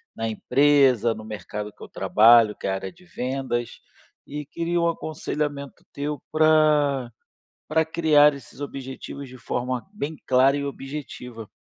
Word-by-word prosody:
na 115 - -2
empresa, 130 0 +3
no 110 0 -9
mercado 105 -1 -6
que - - -26
eu - - -8
trabalho, 115 0 +5
que - - -5
é - - 0
a - - 0
área 95 - -4
de 180 +1 -21
vendas. 130 -5 -3 0.5
E 150 0 -6
queria 170 +3 -2
um 170 - +2
aconselhamento 150 -3 -4
teu 145 0 -4
pra 150 -4 +3 0.6
pra 160 +1 +2
criar 155 -2 +4
esses 140 0 -13
objetivos 135 0 -7
de 130 - -11
forma 125 0 -3
bem 160 -6 -4
clara 130 +2 +4
e 140 - -2
objetiva. 135 -5 -7
140 Hz, 150 wpm, -24 LUFS, 120-150 Hz, 0.6 s, trabalho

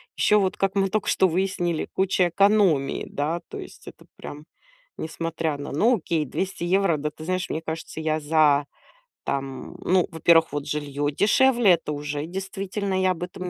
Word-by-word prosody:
Ещё 210 - +4
вот, 190 -2 0
как 195 0 0
мы 195 -1 +2
только 215 +1 -1
что 190 - +3
выяснили, 175 -2 -1
куча 190 -1 +1
экономии, 195 -6 +2
да. 155 +4 -2
То - - -8
есть, - - -11
это - - -12
прям 150 +1 -9 0.5
несмотря 165 -1 -3
на 145 - -6
ну, 225 - +3
окей, 165 -3 -1
200 190 +6 -4
евро. 185 -2 +2
Да 150 +1 -3
ты 155 - -11
знаешь, 185 +2 -2
мне 160 - -2
кажется, 160 0 -6
я 155 0 0
за, 150 -2 +3 0.6
там 135 -1 -4
ну, 185 -1 +2
во-первых, 165 0 +4
вот, 145 0 -4
жилье 145 -1 -2
дешевле, 235 - +4
это 160 -2 -5
уже, 145 0 -4
действительно, 190 +2 -3
я 185 0 +3
об 175 -1 -4
этом 180 0 -6
170 Hz, 175 wpm, -24 LUFS, 150-190 Hz, 0.6 s, Ещё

